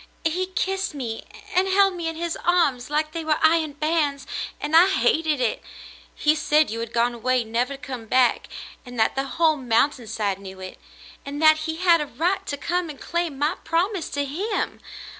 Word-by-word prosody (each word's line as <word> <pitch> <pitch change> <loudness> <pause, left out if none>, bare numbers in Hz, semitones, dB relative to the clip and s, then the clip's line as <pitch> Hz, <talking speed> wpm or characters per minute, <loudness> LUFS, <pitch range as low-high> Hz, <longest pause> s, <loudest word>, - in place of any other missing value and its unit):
"He 360 +4 0
kissed 380 -2 -2
me 235 -5 -5 0.3
and 370 +1 +3
held 390 0 +4
me 340 -2 -4
in 325 - -3
his 335 0 -3
arms 290 -9 +2
like 305 +1 0
they 330 0 -4
were 310 -1 +1
iron 315 -2 +3
bands 300 -2 0 0.2
— - - -10
and 300 +2 -1
I 345 +3 +8
hated 305 +1 +2
it. 245 -3 0 0.5
He 300 - +3
said 305 -3 +2
you 230 - -4
had 230 0 -5
gone 240 +1 +1
away 250 +1 0
never 240 +5 -1
to - - -14
come 250 -5 -7
back, 255 +1 +2 0.4
and 245 -2 -9
that 220 - +3
the 270 0 -2
whole 320 -2 +4
mountain 250 0 +1
side 200 -3 -2
knew 190 -1 -10
it; 185 0 -9 0.4
and 285 +1 -6
that 310 0 +6
he 320 - -2
had 340 -1 +4
a 295 - -3
right 365 +7 -1
to 285 - -3
come 345 +3 -2
and 295 - -9
claim 340 -4 -2
my 300 +6 0
promise 355 +2 0
to 285 0 -2
him. 385 +10 -3
300 Hz, 200 wpm, -24 LUFS, 255-335 Hz, 0.5 s, I